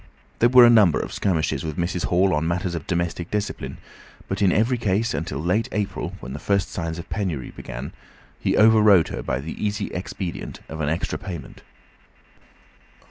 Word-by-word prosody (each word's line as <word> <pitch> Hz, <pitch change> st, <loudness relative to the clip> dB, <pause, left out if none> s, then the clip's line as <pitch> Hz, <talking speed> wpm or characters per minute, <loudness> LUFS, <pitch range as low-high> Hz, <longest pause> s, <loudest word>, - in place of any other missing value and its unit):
There 120 Hz, -, +5 dB
were 125 Hz, -1 st, +9 dB
a -, -, +7 dB
number 105 Hz, -8 st, +5 dB
of -, -, -5 dB
skirmishes 80 Hz, -7 st, 0 dB
with 80 Hz, -2 st, -4 dB
Mrs. 85 Hz, 0 st, -1 dB
Hall 95 Hz, +2 st, +3 dB
on 75 Hz, +2 st, 0 dB
matters 90 Hz, +1 st, -1 dB
of 80 Hz, -4 st, -5 dB
domestic 85 Hz, 0 st, -2 dB
discipline, 105 Hz, 0 st, -3 dB, 0.5 s
but 95 Hz, +1 st, -3 dB
in 95 Hz, -2 st, +4 dB
every 115 Hz, +6 st, +2 dB
case 110 Hz, +2 st, 0 dB
until 75 Hz, -1 st, -3 dB
late 90 Hz, +9 st, 0 dB
April, 95 Hz, -3 st, -3 dB
when 65 Hz, -, -7 dB
the 75 Hz, -, -5 dB
first 100 Hz, +4 st, 0 dB
signs 80 Hz, -2 st, -3 dB
of 85 Hz, -, -8 dB
penury 90 Hz, -, -3 dB
began, -, -, -7 dB, 0.5 s
he -, -, 0 dB
over 110 Hz, 0 st, +6 dB
rode 100 Hz, -6 st, +5 dB
her -, -, -4 dB
by 60 Hz, -, -2 dB
the 80 Hz, +8 st, -6 dB
easy 105 Hz, -1 st, -1 dB
expedient 90 Hz, -1 st, -5 dB
of 80 Hz, 0 st, -6 dB
an 75 Hz, -, 0 dB
extra 80 Hz, +2 st, -2 dB
payment. 85 Hz, -5 st, -8 dB
90 Hz, 185 wpm, -23 LUFS, 80-105 Hz, 0.5 s, were